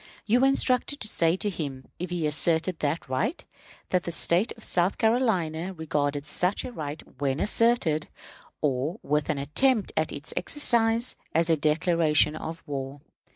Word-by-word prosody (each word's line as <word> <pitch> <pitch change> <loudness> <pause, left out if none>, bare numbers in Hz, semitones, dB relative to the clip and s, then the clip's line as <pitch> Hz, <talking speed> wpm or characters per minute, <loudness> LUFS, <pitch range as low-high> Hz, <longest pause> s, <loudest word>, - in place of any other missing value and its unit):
You 235 +3 +3
were 265 - +5
instructed 270 +1 +1
to 215 - -2
say 165 -4 +2
to 205 +2 -2
him, 140 -7 -5
if 180 +1 -4
he 175 -3 -2
asserted 160 +3 +1
that 150 +3 -2
right, 210 - -2 0.5
that 180 - +3
the 170 - -5
State 175 +6 +2
of 225 - -14
South 180 +2 +1
Carolina 190 -8 +1
regarded 145 -3 -2
such 180 +6 -1
a - - -6
right 150 -7 -6 0.2
when 140 0 0
asserted, 210 -9 +2 0.5
or 150 - -1
with 150 0 0
an 155 - 0
attempt 210 - +1
at - - 0
its - - -7
exercise, 235 -5 +2 0.2
as 165 +1 +3
a - - +5
declaration 155 0 +2
of 160 +1 -6
war. 140 -1 -5
165 Hz, 160 wpm, -26 LUFS, 150-215 Hz, 0.5 s, were